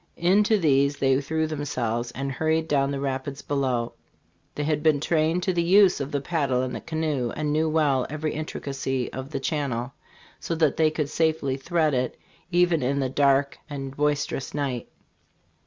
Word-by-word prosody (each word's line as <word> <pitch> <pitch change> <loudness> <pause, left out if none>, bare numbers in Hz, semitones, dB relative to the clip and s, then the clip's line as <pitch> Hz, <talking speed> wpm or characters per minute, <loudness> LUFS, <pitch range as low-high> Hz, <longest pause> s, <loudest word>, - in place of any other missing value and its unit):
In 180 +5 +4
to 215 0 +3
these 140 -4 +2
they 135 0 +2
threw 160 +2 -1
themselves, 125 -6 -2
and 135 +1 -3
hurried 160 +4 0
down 140 -2 +2
the 140 -1 -2
rapids 135 0 -3
below. 130 -5 -1 0.6
They 150 - -2
had 150 0 0
been 155 -2 +3
trained 160 +3 +1
to 185 - +1
the 175 - +1
use 185 +1 +5
of 140 - -4
the 140 - -1
paddle 140 -6 0
and 130 - -3
the - - -5
canoe, 155 -6 -1
and 150 -1 -1
knew 160 +1 +2
well 145 -5 +2
every 155 +1 -3
intricacy 135 -4 -3
of 130 +1 -6
the 140 - -3
channel, 135 -4 -2 0.5
so 165 - -3
that 155 -4 +2
they 160 0 +4
could 150 -2 -2
safely 155 -4 +1
thread 155 +2 0
it, 125 -1 -1 0.3
even 175 -2 +3
in 135 +3 0
the 130 -2 0
dark 140 0 +2
and 135 -2 -6
boisterous 145 -1 -1
night. 135 -5 -2
145 Hz, 180 wpm, -25 LUFS, 135-160 Hz, 0.6 s, use